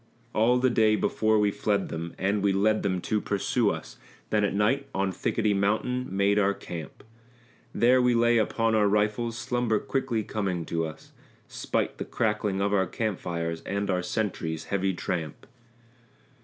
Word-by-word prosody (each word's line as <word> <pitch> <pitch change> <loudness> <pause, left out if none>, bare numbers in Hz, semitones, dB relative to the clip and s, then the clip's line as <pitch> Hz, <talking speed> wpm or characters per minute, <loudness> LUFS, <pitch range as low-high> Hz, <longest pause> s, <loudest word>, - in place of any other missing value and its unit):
All 120 +3 +3
the 130 0 +2
day 110 -2 +4
before 110 0 +1
we 105 -1 +3
fled 100 -1 -1
them, 85 +1 -5
and 100 +2 0
we 100 -1 +2
led 105 +2 +2
them 95 -3 -1
to 105 +2 -1
pursue 100 -2 +1
us, - - -6 0.3
Then 105 -1 +2
at 100 - 0
night 135 +7 +1
on 95 0 0
Thickety 105 +3 0
Mountain 110 +6 0
made 100 +2 +2
our 100 0 +2
camp; 85 -3 -8 0.7
There 125 +2 +4
we 125 -1 +3
lay 120 0 +4
upon 115 +1 +1
our 105 -2 +4
rifles, 105 +3 0
slumber 120 -3 0
quickly 130 -2 -1
coming 95 -6 -2
to 80 -1 -1
us, 80 0 -12 0.4
Spite - - -2
the - - -3
crackling 105 -3 -1
of 100 0 0
our 95 -2 +2
camp 110 0 -2
fires 85 -1 -3
and 100 0 -2
our 90 -1 0
sentries' 90 -5 -3
heavy 95 -1 +1
tramp. 85 -2 -4
105 Hz, 170 wpm, -27 LUFS, 95-110 Hz, 0.7 s, day